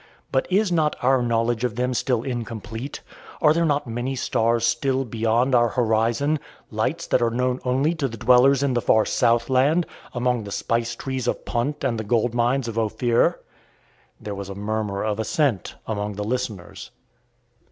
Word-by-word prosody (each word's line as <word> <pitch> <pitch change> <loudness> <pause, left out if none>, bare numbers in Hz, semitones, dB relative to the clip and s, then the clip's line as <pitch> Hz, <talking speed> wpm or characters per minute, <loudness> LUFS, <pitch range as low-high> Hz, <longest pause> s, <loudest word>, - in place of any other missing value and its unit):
But 130 - +1
is 195 +1 +2
not 155 -3 +2
our 130 0 +4
knowledge 115 0 0
of 120 -4 -1
them 125 +1 0
still 120 -1 0
incomplete? 115 0 -5 0.4
Are 150 -2 +5
there 170 0 +1
not 145 -1 0
many 120 +3 -3
stars 115 -2 +1
still 130 +3 +1
beyond 115 +3 +1
our 120 -1 +5
horizon 115 +6 +1 0.3
lights 130 +10 -1
that - - +1
are 120 - +3
known 125 +2 -1
only 135 +6 +1
to 155 -5 -1
the 115 -2 -8
dwellers 125 +4 +5
in 140 -2 +1
the 120 - +1
far 110 -1 +3
south 115 0 +2
land, 140 +7 +3 0.3
among 125 -2 0
the 100 - -8
spice 115 +3 -1
trees 130 -1 -4
of - - -2
Punt 125 +6 -2
and 120 -4 0
the - - -3
gold 115 +2 +1
mines 120 +2 +1
of 115 0 -2
Ophir?" 115 +2 +1 0.8
There 105 - -6
was 100 0 -6
a 100 - -6
murmur 105 -1 -2
of 105 0 -2
assent 120 - 0
among 105 -1 -3
the 105 - -3
listeners. 110 -5 -4
120 Hz, 175 wpm, -23 LUFS, 115-130 Hz, 0.8 s, Are